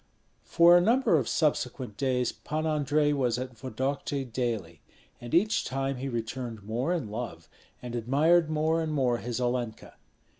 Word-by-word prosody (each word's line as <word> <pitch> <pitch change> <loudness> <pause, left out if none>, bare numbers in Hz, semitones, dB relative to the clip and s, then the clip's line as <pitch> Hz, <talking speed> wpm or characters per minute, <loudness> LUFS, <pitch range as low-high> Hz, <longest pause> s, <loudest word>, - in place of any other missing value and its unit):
For 170 +1 +6
a 175 - +6
number 230 0 +3
of 125 - -3
subsequent 130 -6 -1
days 125 -1 0
Pan 155 +1 -4
Andrei 150 -1 +1
was 125 -4 0
at 125 -1 -5
Vodokty 135 +3 -3
daily; 115 - -3 0.4
and 120 - -8
each 210 +7 +3
time 135 +1 -2
he 135 +2 -4
returned 115 -2 -5
more 120 - -2
in 150 -12 -2
love, 105 -8 -6 0.4
and 120 -1 -6
admired 150 +8 +3
more 155 +1 +1
and 160 -1 -2
more 130 -5 +1
his 120 0 -4
Olenka. 120 -2 -3
130 Hz, 155 wpm, -28 LUFS, 120-155 Hz, 0.4 s, For